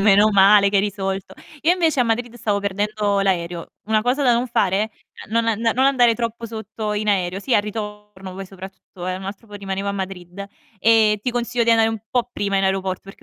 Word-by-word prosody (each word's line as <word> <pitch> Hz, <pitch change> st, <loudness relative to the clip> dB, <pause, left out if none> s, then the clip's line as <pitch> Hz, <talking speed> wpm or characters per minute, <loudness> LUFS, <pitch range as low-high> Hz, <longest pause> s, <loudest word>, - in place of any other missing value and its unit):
Meno 205 Hz, +1 st, +5 dB
male 200 Hz, +1 st, +6 dB
che 200 Hz, -, +1 dB
hai 195 Hz, -, +4 dB
risolto. 195 Hz, -2 st, -3 dB, 0.3 s
Io 330 Hz, -, +4 dB
invece 330 Hz, -6 st, +1 dB
a -, -, +6 dB
Madrid 240 Hz, +1 st, -1 dB
stavo 205 Hz, -4 st, -1 dB
perdendo 205 Hz, 0 st, -1 dB
l'aereo. 175 Hz, -3 st, -1 dB, 0.2 s
Una 215 Hz, 0 st, +2 dB
cosa 250 Hz, +5 st, +1 dB
da 250 Hz, -3 st, +4 dB
non 240 Hz, +2 st, 0 dB
fare: 210 Hz, -1 st, +1 dB, 0.4 s
non 230 Hz, +1 st, +1 dB
an 225 Hz, -1 st, 0 dB
non 235 Hz, +3 st, +2 dB
andare 245 Hz, -4 st, +4 dB
troppo 230 Hz, 0 st, -4 dB
sotto 220 Hz, -1 st, -5 dB
in 210 Hz, +1 st, -2 dB
aereo. 185 Hz, -2 st, +1 dB
Sì, 250 Hz, +3 st, 0 dB
al 205 Hz, -, +4 dB
ritorno 210 Hz, -3 st, -7 dB
poi 195 Hz, -, -6 dB
soprattutto, 190 Hz, -1 st, -10 dB
eh, 185 Hz, -, -2 dB
un 190 Hz, -, -9 dB
altro 200 Hz, +3 st, -8 dB
po' 210 Hz, -, -13 dB
rimanevo 195 Hz, 0 st, -4 dB
a -, -, -1 dB
Madrid. 190 Hz, -1 st, -6 dB, 0.3 s
Ehm, 220 Hz, 0 st, +4 dB
ti 250 Hz, -, -1 dB
consiglio 240 Hz, 0 st, -1 dB
di 230 Hz, -, +3 dB
andare 225 Hz, -1 st, +4 dB
un 225 Hz, -1 st, -3 dB
po' 245 Hz, -1 st, 0 dB
prima 200 Hz, -1 st, -1 dB
in 195 Hz, -, +2 dB
aeroporto 190 Hz, -1 st, -1 dB
perché 195 Hz, -, -13 dB
210 Hz, 220 wpm, -21 LUFS, 195-230 Hz, 0.4 s, male